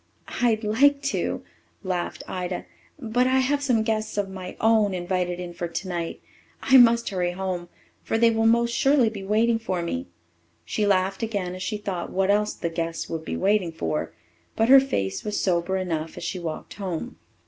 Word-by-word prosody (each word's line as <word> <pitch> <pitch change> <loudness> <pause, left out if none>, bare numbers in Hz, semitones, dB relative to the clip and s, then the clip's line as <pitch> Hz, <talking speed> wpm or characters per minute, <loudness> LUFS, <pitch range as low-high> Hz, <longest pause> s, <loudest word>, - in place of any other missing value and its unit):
"I'd 225 -2 +2
like 280 +7 +3
to," - - -2 0.4
laughed 180 -2 -3
Ida, 180 -1 -4 0.3
"but 245 0 +1
I 260 0 +3
have 280 +2 +1
some 245 -6 +2
guests 220 -1 -2
of 200 -1 0
my 185 -1 -7
own 220 -3 +3
invited 180 0 -2
in 175 -1 -6
for 175 0 -4
tonight. 170 0 -4 0.4
I 265 -1 +6
must 235 -1 +6
hurry 180 -2 -1
home, 180 -2 -4 0.3
for 225 - -1
they 230 0 +5
will 225 0 +2
most 235 +1 +3
surely 270 -2 +4
be 205 -3 -7
waiting 225 +3 +2
for 185 -6 -2
me." 85 - -3 0.6
She 210 -1 0
laughed 190 0 +1
again 200 -5 -2
as 185 - -8
she 210 +3 -2
thought 195 -4 -4
what 195 +1 +2
else 210 +1 +1
the 170 - -3
guests 165 0 -3
would 165 -1 -3
be - - -4
waiting 195 -3 +2
for. 80 - -3 0.4
But 225 +2 +2
her 270 +1 +10
face 95 - -2
was 210 -1 -2
sober 185 0 +1
enough 165 -4 -3
as - - -6
she 175 +2 -3
walked 165 -3 -6
home. 185 -5 -5
195 Hz, 185 wpm, -25 LUFS, 175-225 Hz, 0.6 s, her